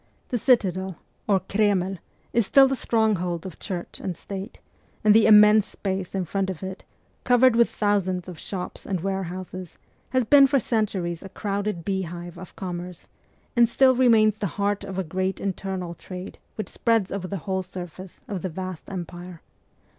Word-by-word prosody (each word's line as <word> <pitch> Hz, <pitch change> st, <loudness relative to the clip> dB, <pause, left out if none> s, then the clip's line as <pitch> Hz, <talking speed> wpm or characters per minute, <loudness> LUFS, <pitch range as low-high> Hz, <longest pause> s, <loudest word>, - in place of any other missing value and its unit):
The 245 Hz, -, -1 dB
citadel, 190 Hz, -, +2 dB, 0.3 s
or 195 Hz, -3 st, +3 dB
Kremlis 195 Hz, -2 st, +1 dB, 0.4 s
still 270 Hz, +5 st, +6 dB
the 270 Hz, -, 0 dB
stronghold 195 Hz, -9 st, 0 dB
of 185 Hz, -, -8 dB
Church 175 Hz, -2 st, -6 dB
and 180 Hz, -4 st, -4 dB
State; 195 Hz, +2 st, -7 dB, 0.4 s
and 210 Hz, -1 st, +6 dB
the 220 Hz, 0 st, +6 dB
immense 210 Hz, -1 st, +7 dB
space 190 Hz, -2 st, -4 dB
in 190 Hz, -2 st, -1 dB
front 195 Hz, +3 st, -1 dB
of 185 Hz, -1 st, -5 dB
it, 190 Hz, +1 st, -6 dB, 0.4 s
covered 250 Hz, -1 st, +5 dB
with 235 Hz, 0 st, +4 dB
thousands 190 Hz, -4 st, 0 dB
of 175 Hz, -4 st, -8 dB
shops 185 Hz, -3 st, -6 dB
and 190 Hz, -4 st, -1 dB
warehouses, 185 Hz, -1 st, -4 dB, 0.3 s
has 255 Hz, 0 st, +2 dB
been 275 Hz, +4 st, +7 dB
for 275 Hz, +1 st, +3 dB
centuries 195 Hz, -8 st, -1 dB
a 195 Hz, -, -9 dB
crowded 200 Hz, -3 st, -3 dB
beehive 175 Hz, -3 st, -4 dB
of 185 Hz, -, -11 dB
commerce, 180 Hz, -2 st, -6 dB, 0.5 s
and 235 Hz, -1 st, +5 dB
still 260 Hz, +2 st, +5 dB
remains 220 Hz, -4 st, +4 dB
the 205 Hz, -, 0 dB
heart 205 Hz, 0 st, 0 dB
of 195 Hz, -1 st, -6 dB
a 190 Hz, -, 0 dB
great 185 Hz, +3 st, -2 dB
internal 190 Hz, -2 st, -3 dB
trade 180 Hz, +1 st, -9 dB, 0.2 s
which 215 Hz, -, -5 dB
spreads 225 Hz, -5 st, +1 dB
over 190 Hz, -2 st, -3 dB
the 195 Hz, -, -3 dB
whole 190 Hz, -1 st, 0 dB
surface 185 Hz, 0 st, -9 dB
of 195 Hz, -4 st, -4 dB
the 185 Hz, -, -3 dB
vast 185 Hz, 0 st, -6 dB
empire. 175 Hz, -2 st, -7 dB
190 Hz, 165 wpm, -25 LUFS, 180-215 Hz, 0.5 s, immense